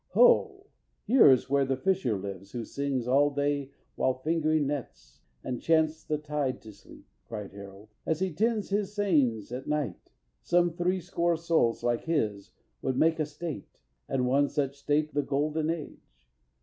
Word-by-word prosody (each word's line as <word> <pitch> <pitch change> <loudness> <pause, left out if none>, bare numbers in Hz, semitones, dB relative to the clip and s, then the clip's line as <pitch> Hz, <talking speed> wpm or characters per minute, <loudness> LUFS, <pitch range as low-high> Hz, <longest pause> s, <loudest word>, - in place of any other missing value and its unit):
"Ho! 470 -5 +4 0.4
here 235 - +7
is 130 -2 +4
where 140 +1 +2
the 135 -1 -1
fisher 180 - 0
lives 100 0 -8
who 120 -2 -4
sings 140 -4 -2
All 140 +3 +4
day 145 -1 -1 0.2
while 130 - +1
fingering 155 +1 +1
nets, 140 -3 -6 0.2
and 125 -2 -4
chants 160 -1 +2
the 155 - -1
tide 150 -3 -2
To 110 - -10
sleep," 100 - -16 0.2
cried 105 -3 -6
Harold, 100 +1 -11
"as 160 -1 -1
he 190 -3 -1
tends 215 +4 0
his 205 0 -1
seines 140 - +1
At 125 +2 -6
night. 150 - -3 0.3
Some 175 -1 +2
three 180 +2 0
score 170 0 0
souls 160 -8 +1
like 120 -1 0
his 110 -12 -1 0.3
would 130 - -1
make 160 +2 +3
A 155 - 0
state, 150 - -7 0.3
and 130 -2 0
one 140 +3 +2
such 140 -2 -1
state 150 +2 0
the 145 - +2
golden 150 +3 -1
age. 150 - -6
145 Hz, 165 wpm, -28 LUFS, 125-165 Hz, 0.4 s, here